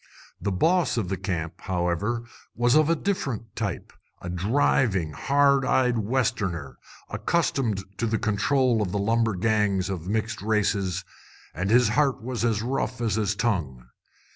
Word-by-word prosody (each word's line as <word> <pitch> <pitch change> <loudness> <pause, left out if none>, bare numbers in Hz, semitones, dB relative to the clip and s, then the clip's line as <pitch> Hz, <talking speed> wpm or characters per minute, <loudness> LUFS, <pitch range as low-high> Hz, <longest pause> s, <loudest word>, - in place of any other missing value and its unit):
The 100 - -1
"boss" 165 - +2
of 100 -6 -1
the 95 - 0
camp, 90 -5 -4
however, 95 +6 -1 0.3
was 120 +1 +2
of 155 0 +4
a 165 - +4
different 135 - -3
type 100 -6 -4 0.3
a 90 - -6
driving, 95 - +1
hard 140 - +3
eyed 125 -2 +2
Westerner, 105 - -1 0.3
accustomed 135 - 0 0.2
to 115 - +1
the 110 0 +1
control 115 +3 +1
of 100 -1 -2
lumber 110 +1 +1
gangs 100 -1 +1
of 90 -2 -5
mixed 110 +1 -2
races, 100 -3 0 0.5
and 95 +3 -2
his 120 0 +5
heart 135 +3 +2
was 120 0 -4
as 110 -3 +1
rough 125 0 -2
as 115 -3 0
his 105 -2 0
tongue. 75 - -2
110 Hz, 145 wpm, -25 LUFS, 95-125 Hz, 0.5 s, his